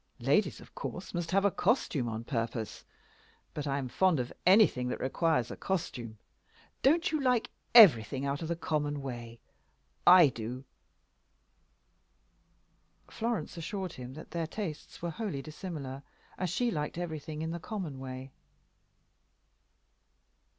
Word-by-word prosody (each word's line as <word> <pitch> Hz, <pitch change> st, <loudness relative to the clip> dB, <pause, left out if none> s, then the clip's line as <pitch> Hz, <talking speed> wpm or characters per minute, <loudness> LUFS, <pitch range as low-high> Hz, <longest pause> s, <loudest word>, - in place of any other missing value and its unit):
Ladies, -, -, +2 dB
of -, -, -15 dB
course, -, -, -6 dB
must 175 Hz, -1 st, -2 dB
have 195 Hz, +1 st, +3 dB
a 200 Hz, -, +4 dB
costume 145 Hz, -, +1 dB
on 110 Hz, 0 st, -4 dB
purpose. 115 Hz, -2 st, -3 dB, 0.7 s
But 150 Hz, -1 st, -4 dB
I 140 Hz, 0 st, 0 dB
am 135 Hz, -2 st, -3 dB
fond 180 Hz, +4 st, +2 dB
of 125 Hz, 0 st, -3 dB
anything 185 Hz, -, +5 dB
that -, -, -3 dB
requires 155 Hz, 0 st, +1 dB
a -, -, -5 dB
costume. 120 Hz, -, -3 dB, 0.6 s
Don't 325 Hz, +6 st, +3 dB
you 310 Hz, -2 st, 0 dB
like 250 Hz, -3 st, +2 dB, 0.2 s
everything 135 Hz, -, +8 dB
out 140 Hz, 0 st, -2 dB
of 165 Hz, -, -3 dB
the 170 Hz, -, -1 dB
common 145 Hz, -3 st, -2 dB
way? 120 Hz, -3 st, -7 dB, 0.7 s
I 175 Hz, -4 st, +9 dB
do." 120 Hz, +2 st, -6 dB, 2.5 s
Florence 225 Hz, -8 st, -2 dB
assured 185 Hz, +1 st, -4 dB
him 125 Hz, +1 st, -8 dB
that 155 Hz, -, -10 dB
their 165 Hz, -2 st, -2 dB
tastes 165 Hz, -4 st, -6 dB
were 170 Hz, -, -1 dB
wholly 180 Hz, -8 st, -4 dB
dissimilar, 150 Hz, -4 st, -6 dB, 0.3 s
as 185 Hz, -, -2 dB
she 240 Hz, +7 st, +1 dB
liked 150 Hz, -2 st, -3 dB
everything 155 Hz, -2 st, -4 dB
in 160 Hz, -, -2 dB
the 170 Hz, -, -4 dB
common 175 Hz, -7 st, -5 dB
way. 130 Hz, 0 st, -7 dB
155 Hz, 135 wpm, -31 LUFS, 130-185 Hz, 2.5 s, I